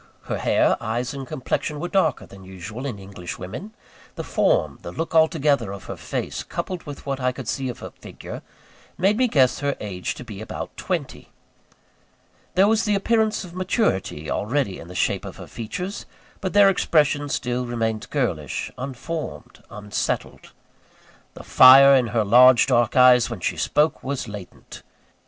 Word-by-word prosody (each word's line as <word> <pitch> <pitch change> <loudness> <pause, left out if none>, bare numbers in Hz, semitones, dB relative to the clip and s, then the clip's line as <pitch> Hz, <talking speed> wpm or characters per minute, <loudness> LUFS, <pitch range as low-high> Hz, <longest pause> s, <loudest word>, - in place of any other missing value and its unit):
Her - - -4
hair, - - +2
eyes, 120 +5 -2
and 135 -2 -7
complexion 145 +4 -3
were 175 - -3
darker 195 +1 +1
than 95 -1 -14
usual 95 +8 -7
in 120 -6 -5
English 95 -3 -8
women. 185 - -8 0.4
The - - -5
form, - - +1
the - - -7
look 165 +1 -4
altogether, 150 - +2
of 100 -1 -8
her - - -7
face, - - -4
coupled 185 -2 -5
with 145 -1 -8
what 135 -1 -3
I 125 -1 +1
could 125 -2 -9
see 135 +1 -2
of 120 - -6
her - - -7
figure, - - -10 0.6
made 195 +4 +3
me 255 +3 +2
guess 135 - +3
her 140 0 -1
age 95 -4 -4
to - - -9
be 105 -4 -9
about 110 - -7
twenty. - - -4 1.3
There 190 +2 +5
was 220 +1 +2
the 210 -1 +2
appearance 220 +2 +1
of 175 -2 -11
maturity 185 - -1
already 115 - -1
in 85 - -10
the 90 - -11
shape - - 0
of - - -9
her - - -9
features; 180 - -6 0.3
but 185 - -4
their 205 -1 +7
expression 150 -6 +2
still 125 -1 -2
remained 115 -2 -2
girlish, - - -2
unformed, 140 +5 -6
unsettled. 105 -1 -4 0.8
The - - -10
fire 135 +2 +8
in 130 -3 +4
her 115 -1 0
large 125 +4 +7
dark 120 -1 +2
eyes, 125 -2 +6
when 120 -4 -6
she - - -1
spoke, 150 +2 +1
was 135 -2 -3
latent. 105 -3 -10
130 Hz, 170 wpm, -23 LUFS, 110-165 Hz, 1.3 s, fire